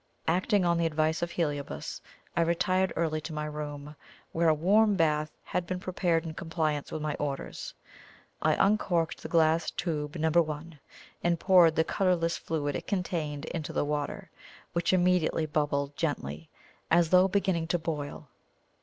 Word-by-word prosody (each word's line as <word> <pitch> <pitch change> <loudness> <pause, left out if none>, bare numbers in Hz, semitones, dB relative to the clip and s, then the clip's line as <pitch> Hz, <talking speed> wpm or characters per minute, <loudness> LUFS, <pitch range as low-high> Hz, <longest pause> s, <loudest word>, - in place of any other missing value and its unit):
Acting 185 +3 +2
on 170 -1 +2
the 165 - +2
advice 155 +1 0
of 170 - -1
Heliobas, 145 -5 -3 0.3
I - - +3
retired 185 +2 +2
early 155 -2 0
to 160 - -6
my 150 0 -3
room, 150 -1 -6 0.4
where 165 0 +2
a - - +5
warm 205 +6 +4
bath 155 -3 +2
had 180 -1 -2
been 185 0 -2
prepared 175 -3 0
in 160 - -5
compliance 160 -4 -2
with 155 - -4
my 155 -1 -1
orders. 140 -2 -4 0.7
I - - +3
uncorked 180 -5 +1
the - - -7
glass 165 0 +3
tube 150 -3 -3
No. 160 -1 +1
1, 155 -1 0 0.4
and 170 -1 +2
poured 175 -4 +6
the 160 - +4
colourless 170 -2 +1
fluid 145 -3 -2
it - - -5
contained 160 -6 -2
into 160 -3 -5
the - - 0
water, 145 -1 -3 0.4
which 170 0 +1
immediately 180 -3 +2
bubbled 145 -2 -1
gently, 80 - -3 0.4
as 170 -1 +4
though 185 +1 +6
beginning 190 -4 0
to 175 - +1
boil. 155 -3 -5
165 Hz, 160 wpm, -29 LUFS, 150-175 Hz, 0.7 s, poured